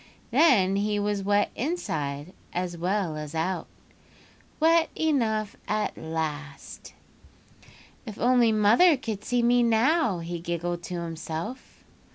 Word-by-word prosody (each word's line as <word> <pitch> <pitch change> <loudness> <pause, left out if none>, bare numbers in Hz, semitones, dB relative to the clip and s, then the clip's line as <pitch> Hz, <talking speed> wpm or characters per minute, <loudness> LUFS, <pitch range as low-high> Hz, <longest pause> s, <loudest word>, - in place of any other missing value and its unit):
Then 195 - +4
he 210 +1 0
was 205 -1 -1
wet 205 +1 +1
inside 160 - -3 0.2
as 180 -1 -3
well 180 -1 -1
as 150 0 -7
out—wet 300 - -2
enough 225 -9 0
at 215 0 -1
last. 155 -3 -6 1.1
"'If 215 - -7
only 245 -1 +4
mother 225 - +5
could 220 -5 -5
see 245 +1 0
me 245 +1 +4
now,' 235 - +2
he 170 0 -5
giggled 170 0 -3
to 175 -1 -4
himself. 165 +8 -6
205 Hz, 115 wpm, -26 LUFS, 170-240 Hz, 1.1 s, mother